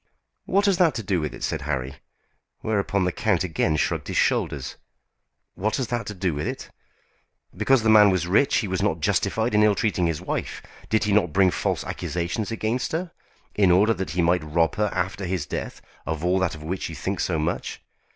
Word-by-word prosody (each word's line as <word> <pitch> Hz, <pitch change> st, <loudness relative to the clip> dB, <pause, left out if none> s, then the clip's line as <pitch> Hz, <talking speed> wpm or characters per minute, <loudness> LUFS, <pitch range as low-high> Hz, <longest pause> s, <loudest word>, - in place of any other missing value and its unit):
"What 200 Hz, +2 st, +2 dB
has 195 Hz, -3 st, +3 dB
that 165 Hz, -7 st, +3 dB
to 115 Hz, -, -3 dB
do 90 Hz, -3 st, 0 dB
with 75 Hz, -, -3 dB
it?" -, -, -9 dB
said -, -, -2 dB
Harry; 70 Hz, -2 st, -3 dB, 0.6 s
whereupon 100 Hz, -2 st, 0 dB
the 90 Hz, -, +1 dB
count 95 Hz, -2 st, +1 dB
again 80 Hz, -3 st, 0 dB
shrugged -, -, -1 dB
his -, -, -3 dB
shoulders. -, -, 0 dB, 0.8 s
"What 110 Hz, +3 st, -1 dB
has 130 Hz, -3 st, -2 dB
that 120 Hz, -2 st, -2 dB
to 105 Hz, -, -5 dB
do 90 Hz, -2 st, -1 dB
with 75 Hz, +1 st, -3 dB
it? -, -, -6 dB, 0.8 s
Because 115 Hz, +4 st, +3 dB
the 110 Hz, -, +3 dB
man 105 Hz, -1 st, +8 dB
was 95 Hz, -3 st, +1 dB
rich 100 Hz, +10 st, +3 dB
he 105 Hz, -, 0 dB
was 95 Hz, -1 st, -2 dB
not 80 Hz, -, 0 dB
justified 110 Hz, +8 st, 0 dB
in 105 Hz, -, +4 dB
ill 105 Hz, -1 st, +4 dB
treating 95 Hz, -5 st, +1 dB
his 80 Hz, -2 st, -2 dB
wife. -, -, -4 dB, 0.3 s
Did 110 Hz, 0 st, +2 dB
he 105 Hz, -, 0 dB
not 90 Hz, -7 st, +2 dB
bring 95 Hz, 0 st, +4 dB
false -, -, -1 dB
accusations 90 Hz, +5 st, -3 dB
against 115 Hz, +4 st, -2 dB
her, 170 Hz, +1 st, -2 dB, 0.4 s
in 100 Hz, -3 st, +3 dB
order 100 Hz, +6 st, +5 dB
that 95 Hz, -3 st, -4 dB
he 85 Hz, -, +3 dB
might 85 Hz, 0 st, +2 dB
rob 80 Hz, +2 st, +1 dB
her 105 Hz, 0 st, +1 dB
after 95 Hz, +2 st, -2 dB
his 90 Hz, -4 st, -2 dB
death -, -, -6 dB, 0.2 s
of 80 Hz, +1 st, -2 dB
all 90 Hz, +2 st, +2 dB
that 95 Hz, -3 st, 0 dB
of 75 Hz, -, -10 dB
which 90 Hz, +4 st, -3 dB
you 80 Hz, -, -7 dB
think 95 Hz, +6 st, -3 dB
so 85 Hz, -, 0 dB
much? 80 Hz, +2 st, -3 dB
95 Hz, 210 wpm, -24 LUFS, 85-110 Hz, 0.8 s, man